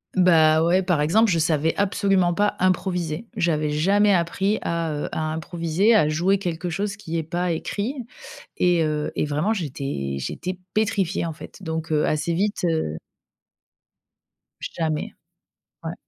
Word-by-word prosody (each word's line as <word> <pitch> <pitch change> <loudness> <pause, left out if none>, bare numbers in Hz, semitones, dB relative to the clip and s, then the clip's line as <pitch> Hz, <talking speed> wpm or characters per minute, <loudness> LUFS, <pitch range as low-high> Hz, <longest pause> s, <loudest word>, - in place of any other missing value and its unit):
Bah, 160 -4 +5
ouais 175 +3 +3
par 180 -5 +1
exemple, 215 +9 +3
je 170 - +2
savais 160 0 +1
absolument 195 -2 +2
pas 205 +3 +1
improviser. 180 0 0
J'avais 155 -5 +1
jamais 195 +8 +3
appris 190 +3 +1
à 170 -1 -1
heu 150 -1 -3
à 155 0 -2
improviser, 170 +6 +1
à 155 -9 +4
jouer 180 +6 +2
quelque 175 -1 -3
chose 200 +4 -2
qui 165 -5 -4
est - - -3
pas 175 +3 -2
écrit. 205 +8 -2 0.6
Et 175 -2 +3
heu 150 -1 -1
et - - 0
vraiment 150 +9 0
j'étais 135 - -3
j'étais 180 - -4 0.2
pétrifiée 200 -5 0
en 165 - -4
fait. 160 - -12
Donc 160 -2 -4
heu, 150 -1 +2
assez 155 +3 0
vite, 200 +4 -1
heu 160 - -1 1.6
Jamais, 160 -2 -3 0.7
ouais. - - -4
170 Hz, 150 wpm, -23 LUFS, 155-195 Hz, 1.6 s, Bah